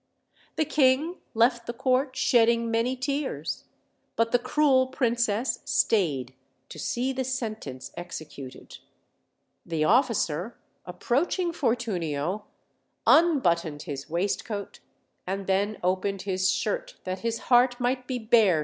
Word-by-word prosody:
The 315 - +1
king 295 +3 +2 0.2
left 235 +1 +3
the 240 - -3
court 260 +2 +1
shedding 235 -3 +3
many 230 +3 +1
tears; 265 - -3 0.5
but 230 0 +1
the 245 - +4
cruel 265 -1 +3
princess 235 -2 0
stayed 140 - +1 0.4
to - - -9
see 255 +2 -1
the 260 0 -2
sentence 220 - -5
executed. 155 -6 -9 0.8
The 165 -2 -1
officer, 225 - +1 0.3
approaching 295 - 0
Fortunio, 205 - -1 0.6
unbottoned 170 - +3
his 145 -2 -6
waistcoat, 200 +4 -3 0.5
and 195 +1 -3
then 200 +3 0
opened 185 +1 0
his 190 -1 +1
shirt, - - -2
that 185 0 -4
his 230 0 -1 0.2
heart 245 0 +5
might 250 +1 -1
be 255 - -2
bare - - -7
OLD, - - -15
OLD - - -25
FAIR7 225 -4 +7
TALES. 165 -4 +3
230 Hz, 130 wpm, -27 LUFS, 185-260 Hz, 0.8 s, FAIR7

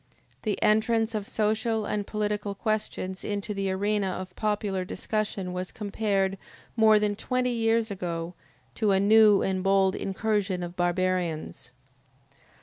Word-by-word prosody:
The 210 -3 -2
entrance 225 +1 +2
of 210 -2 -3
social 220 0 0
and 205 -1 -2
political 210 -1 -2
questions 210 -3 -3
into 205 0 -3
the 195 -1 -2
arena 200 +1 0
of 185 0 -5
popular 205 -3 -1
discussion 200 -1 -3
was 180 0 -4
compared, 200 -2 -1 0.4
more 220 -2 +6
than 210 -1 +1
twenty 250 +3 -1
years 225 -1 +1
ago, 170 -2 -4 0.4
to 210 -3 +1
a 190 - +3
new 210 0 +6
and 190 -1 0
bold 195 0 +3
incursion 195 -2 -1
of 175 0 -6
barbarians. 175 -4 -1
205 Hz, 135 wpm, -27 LUFS, 190-215 Hz, 0.4 s, more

